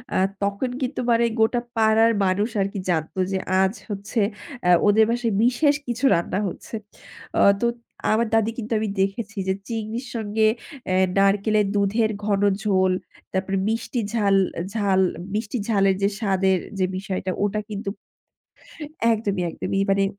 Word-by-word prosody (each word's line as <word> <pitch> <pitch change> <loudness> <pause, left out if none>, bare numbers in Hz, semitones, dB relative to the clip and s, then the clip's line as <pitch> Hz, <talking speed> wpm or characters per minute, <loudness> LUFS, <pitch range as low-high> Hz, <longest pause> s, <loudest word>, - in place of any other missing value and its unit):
আ - - +3 0.3
তখন 200 +6 -1
কিন্তু 255 +1 -2
মানে 235 0 +4
গোটা 225 +2 +3 0.2
পাড়ার 225 0 +4
মানুষ 195 +4 +1
আর 195 - +1
কি 200 - -3
জানত 160 -1 -1 0.2
যে 190 - 0 0.2
আজ 190 +1 +2 0.2
হচ্ছে 205 +3 -3 0.4
অ্যাঁ 180 -1 +6
ওদের 220 +2 +5
বাসায় 235 -2 0
বিশেষ 285 +4 +3
কিছু 240 +3 -1
রান্না 170 +3 0
হচ্ছে। 190 - -7 0.6
অ - - +5 0.2
তো 235 - +3 0.5
আমার 230 +2 +2
দাদি 225 0 +2
কিন্তু 230 -1 -3
আমি 215 -1 -1
দেখেছি 205 +2 -2
যে 190 - +2
চিংড়ির 225 +2 -4
সঙ্গে 220 0 +1 0.4
অ্যাঁ 185 0 +3
নারকেলের 205 +1 +3
দুধের 210 +2 +2
ঘন 200 -2 +1 0.2
ঝোল, 190 -3 +2 0.4
তারপরে 195 +1 -1
মিষ্টি 230 +2 -2
ঝাল, 205 -4 +3 0.4
ঝাল-মিষ্টি, 200 +1 0
ঝালের 195 -4 +3
যে 200 - +4
স্বাদের 190 -3 +2 0.2
যে 185 - +3
বিষয়টা 190 -1 -3
ওটা 205 +1 0
কিন্তু 200 -1 -4 1.2
একদমই, 205 -4 -1
একদমই 195 - -3
ই - - +1
মানে, 195 0 +3
205 Hz, 150 wpm, -23 LUFS, 195-225 Hz, 1.2 s, অ্যাঁ